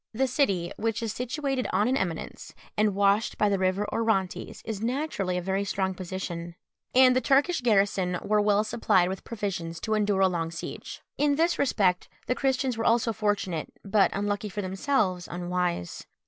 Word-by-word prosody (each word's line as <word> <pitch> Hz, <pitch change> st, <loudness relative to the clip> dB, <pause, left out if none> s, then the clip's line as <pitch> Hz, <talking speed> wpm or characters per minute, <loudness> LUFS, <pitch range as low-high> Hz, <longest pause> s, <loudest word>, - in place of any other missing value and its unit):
The 265 Hz, +4 st, +2 dB
city, 200 Hz, -, 0 dB
which 225 Hz, +1 st, -1 dB
is 220 Hz, -2 st, -2 dB
situated 260 Hz, +1 st, -2 dB
on 210 Hz, -, +2 dB
an 260 Hz, -, +2 dB
eminence, 175 Hz, -9 st, -4 dB, 0.2 s
and 210 Hz, -2 st, +2 dB
washed 200 Hz, +2 st, +2 dB
by 210 Hz, -, +3 dB
the 200 Hz, -1 st, +1 dB
river 190 Hz, +2 st, +1 dB
Orontes, 220 Hz, -5 st, -1 dB
is 220 Hz, -2 st, -4 dB
naturally 235 Hz, -7 st, -1 dB
a 180 Hz, -, -3 dB
very 195 Hz, +2 st, 0 dB
strong 190 Hz, -1 st, -1 dB
position, 175 Hz, -2 st, -5 dB, 0.4 s
and 255 Hz, -1 st, +7 dB
the 255 Hz, -, +3 dB
Turkish 285 Hz, +5 st, +2 dB
garrison 195 Hz, -5 st, +2 dB
were 210 Hz, 0 st, +2 dB
well 205 Hz, 0 st, +3 dB
supplied 210 Hz, -5 st, +2 dB
with 190 Hz, 0 st, -5 dB
provisions 175 Hz, -7 st, -4 dB
to 220 Hz, -, -1 dB
endure 205 Hz, -2 st, +1 dB
a 190 Hz, -, +6 dB
long 170 Hz, -3 st, -2 dB
siege. 165 Hz, -, -7 dB, 0.2 s
In 290 Hz, 0 st, +3 dB
this 335 Hz, +3 st, +1 dB
respect 190 Hz, -9 st, +1 dB, 0.2 s
the -, -, +1 dB
Christians 260 Hz, -2 st, 0 dB
were 225 Hz, -, -1 dB
also 230 Hz, 0 st, +3 dB
fortunate, 205 Hz, -6 st, -1 dB
but 200 Hz, 0 st, +4 dB
unluckily 205 Hz, +1 st, -2 dB
for 205 Hz, +1 st, -4 dB
themselves, 190 Hz, -2 st, 0 dB
unwise. 175 Hz, -, -3 dB
205 Hz, 175 wpm, -27 LUFS, 185-230 Hz, 0.4 s, and